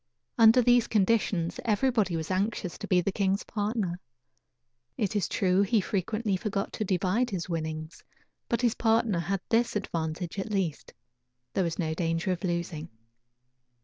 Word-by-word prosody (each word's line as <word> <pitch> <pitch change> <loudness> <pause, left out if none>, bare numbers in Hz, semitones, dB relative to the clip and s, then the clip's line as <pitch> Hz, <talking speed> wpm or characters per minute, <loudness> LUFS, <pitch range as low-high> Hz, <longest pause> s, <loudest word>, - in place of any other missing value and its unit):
Under 230 +2 +6
these 245 -1 +4
conditions 195 -5 +1
everybody 220 -4 +1
was 160 +2 -3
anxious 185 -2 -1
to 205 - -6
be 180 -2 +3
the 195 - -1
king's 195 0 0
partner. 205 -4 -2 1.0
It 210 -1 -1
is 205 - 0
true 185 0 +2
he 215 +3 +3
frequently 205 +2 -1
forgot 200 -1 -3
to - - -2
divide 195 +5 +1
his 185 -4 -3
winnings, 160 -1 -4 0.5
but 235 - +1
his 240 -3 +3
partner 225 -5 +2
had 195 +2 -2
this 235 0 +2
advantage, 170 -2 -3
at 195 - -3
least: 190 -7 -2 0.6
there 190 - +1
was 170 -2 -2
no 160 -3 -1
danger 165 +2 -1
of 180 +2 -3
losing. 170 -3 -3
195 Hz, 150 wpm, -28 LUFS, 170-220 Hz, 1.0 s, Under